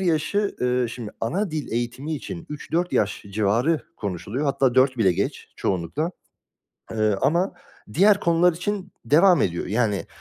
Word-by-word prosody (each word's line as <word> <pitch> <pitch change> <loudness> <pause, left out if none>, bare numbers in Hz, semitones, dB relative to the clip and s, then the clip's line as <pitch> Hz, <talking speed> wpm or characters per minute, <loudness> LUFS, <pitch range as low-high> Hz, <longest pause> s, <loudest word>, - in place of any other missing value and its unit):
yaşı, 190 +4 0
eee, 125 0 +1
şimdi 115 -2 -7
ana 180 - -1
dil 155 -2 -4
eğitimi 120 +6 -2
için 170 +3 -7
3-4 165 +4 -2
yaş 100 - 0
civarı 115 +10 +1 0.2
konuşuluyor. 100 - -3
Hatta 135 -3 +2
4 130 0 +4
bile 95 -5 +4
geç - - -3
çoğunlukla. 95 - -1 0.8
Eee, 110 -2 +1
ama 170 +8 +2 0.4
diğer 200 +4 +5
konular 170 +1 +4
için 185 +2 -4
devam 170 +5 +5
ediyor. 85 -1 -1
Yani, 105 -1 0
140 Hz, 140 wpm, -24 LUFS, 115-170 Hz, 0.8 s, diğer